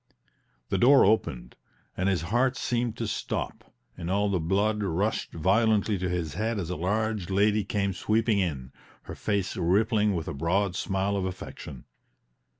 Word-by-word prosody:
The - - 0
door 135 +3 +7
opened, 65 - 0 0.4
and 95 +1 0
his 90 -4 0
heart 130 +1 +2
seemed 120 -1 -1
to 115 - -2
stop, - - -4 0.2
and 85 - -6
all 100 +2 +1
the 95 - +1
blood 100 +6 +1
rushed 100 +3 -1
violently 105 +4 +2
to 90 0 -1
his 85 -4 -2
head 110 +1 -1
as 90 -3 -3
a - - -2
large 105 +2 -1
lady 105 +2 +2
came 100 -1 -1
sweeping 110 +3 +1
in, 70 -9 -2 0.3
her - - -8
face 100 -3 -2
rippling 105 +3 +2
with 80 -2 -3
a - - -3
broad 90 +6 0
smile 95 +1 -1
of 95 -2 -1
affection. 75 -7 -8
100 Hz, 160 wpm, -27 LUFS, 90-110 Hz, 0.4 s, door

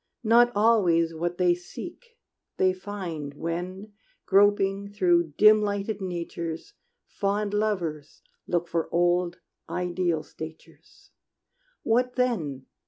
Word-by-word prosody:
Not 240 +2 +5
always 185 -7 +3
what 175 +2 -3
they 180 -1 +4
seek 360 - -10 0.4
they 185 0 +3
find 180 -7 -6
When, 180 +6 -5 0.3
groping 200 0 +3
through 175 -6 +2
dim 215 0 +7
lighted 205 0 -2
natures, 170 - -5 0.3
Fond 205 +1 -2
lovers 180 -9 -2 0.2
look 175 -1 0
for 165 -1 -2
old, 175 0 +1 0.3
ideal 175 -3 -1
statures. 160 +1 -12 0.7
What 250 +2 +1
then? 165 - -1
185 Hz, 105 wpm, -26 LUFS, 170-210 Hz, 0.7 s, dim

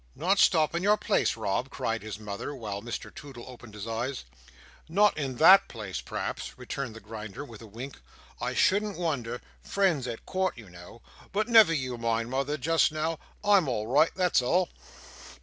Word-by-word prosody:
"Not 195 +3 +1
stop 160 -3 +4
in 170 - -1
your 205 +2 +4
place, 210 - +1
Rob!" 110 +4 -1
cried 115 -5 -2
his 110 0 -6
mother; 105 +6 -6
while 105 -5 -5
Mr 120 +2 -6
Toodle 135 -5 -10
opened 120 -4 -12
his 105 0 -6
eyes. 120 +4 -3 0.7
"Not 205 +5 +4
in 135 -4 -3
that 185 +9 +7
place, 105 -6 -6
p'raps," - - -5
returned 125 -1 -5
the - - -8
Grinder, 110 +3 -8
with 115 -5 -12
a 115 - -11
wink. 120 - -9 0.4
"I - - -2
shouldn't 205 +1 +2
wonder—friends 150 +2 -1
at 115 -2 -6
court 190 -4 -1
you 105 -6 -12
know—but 115 - -6
never 225 -7 +7
you 130 -6 -2
mind, 115 0 -1
mother, 140 +3 -1
just 160 +3 +2
now; 155 +1 -2 0.2
I'm 200 -6 +4
all 110 -4 -1
right, 145 +8 +4
that's 180 -7 +3
all." 170 +8 +1
130 Hz, 170 wpm, -28 LUFS, 115-170 Hz, 0.7 s, that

